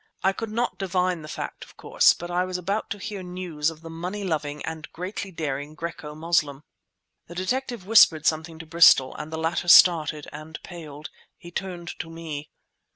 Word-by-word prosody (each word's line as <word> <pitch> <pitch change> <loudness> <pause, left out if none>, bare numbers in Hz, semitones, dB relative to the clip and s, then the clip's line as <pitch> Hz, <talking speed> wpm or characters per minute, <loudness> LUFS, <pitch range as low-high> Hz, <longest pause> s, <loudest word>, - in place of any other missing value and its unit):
I 195 - +3
could 225 +3 -5
not 235 +3 -2
divine 180 -2 0
the 155 - -9
fact, - - -6
of - - -17
course, - - +4
but 175 +1 -7
I 180 +1 +1
was 185 0 -3
about 195 +4 -2
to 205 - -3
hear 205 -1 -6
news 180 -4 -2
of 160 -1 -11
the 165 - -9
money 180 +5 -5
loving 150 -5 -2
and 160 -1 -6
greatly 190 +3 -5
daring 150 -3 -4
Graeco 155 -2 -6
Moslem. 155 -4 0 0.6
The 170 - -10
detective 235 +3 -2
whispered 175 -7 +6
something 160 +1 0
to 165 - -9
Bristol, 160 -5 +6
and 155 - -7
the 160 - -4
latter 165 +2 -1
started, 155 -4 +6
and 155 +1 -8
paled. 155 -4 -9 0.3
He 175 -1 -12
turned 175 -1 -5
to 160 - -5
me. 160 -3 -7
170 Hz, 185 wpm, -25 LUFS, 155-185 Hz, 0.6 s, whispered